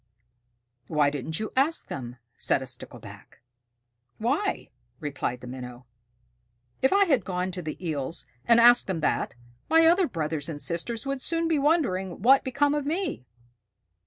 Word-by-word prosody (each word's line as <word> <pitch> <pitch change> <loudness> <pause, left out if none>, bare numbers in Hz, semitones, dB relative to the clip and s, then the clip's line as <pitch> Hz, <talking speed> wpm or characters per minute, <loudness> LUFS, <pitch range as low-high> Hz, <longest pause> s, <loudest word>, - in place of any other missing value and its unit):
"Why 150 -2 +2
didn't 150 +3 -4
you 215 - -4
ask 285 +5 +2
them?" 125 -3 -6 0.2
said 130 - +2
a - - -6
Stickleback. 125 -1 -10 0.8
"Why?" 285 - -1 0.3
replied 135 -4 -3
the - - -9
Minnow. 125 -1 -8 1.0
"If 265 - +3
I 400 +1 +5
had 275 - +2
gone 180 0 -2
to 180 0 -5
the 155 -2 -5
Eels 150 0 -3 0.2
and 235 0 +6
asked 240 +1 +6
them 180 -5 -2
that, 150 - 0 0.3
my 325 +1 +6
other 350 +2 +5
brothers 155 - -3
and 150 -3 -5
sisters 195 - -3
would 275 -1 -3
soon 330 +2 0
be 320 -3 +2
wondering 245 - +1
what 265 +3 +8
had - - -27
become 285 +3 +1
of 295 -1 -1
me." 310 - -3
210 Hz, 160 wpm, -26 LUFS, -, 1.0 s, what